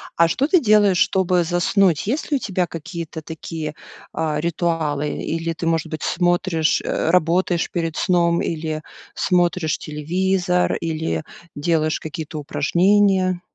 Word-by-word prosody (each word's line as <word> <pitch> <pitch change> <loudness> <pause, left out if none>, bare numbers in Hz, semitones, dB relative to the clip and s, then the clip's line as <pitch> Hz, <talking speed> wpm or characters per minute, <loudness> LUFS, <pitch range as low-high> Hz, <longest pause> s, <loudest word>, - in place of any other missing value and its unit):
А 170 - +5
что 210 +11 0
ты 360 +3 +4
делаешь, 210 - +4
чтобы 185 -2 +2
заснуть? 175 0 +2
Есть 260 +9 -2
ли 295 - +2
у - - -5
тебя 185 -6 -1
какие-то 165 -1 -7
такие, 160 -1 -6 0.4
а, 155 -2 -1
ритуалы? 160 -3 -1
Или 165 +1 -2
ты, 165 - -6
может 165 -1 0
быть, 155 -1 -6
смотришь, 175 -2 +1
э, - - -1
работаешь 175 0 +2
перед 165 -2 -2
сном 170 -2 +2
или 155 -1 -3 0.3
смотришь 175 -3 +1
телевизор, 180 +4 0
или 155 - -2 0.3
делаешь 155 +1 0
какие-то 155 0 -6
упражнения? 185 +4 +2
170 Hz, 135 wpm, -21 LUFS, 160-185 Hz, 0.4 s, А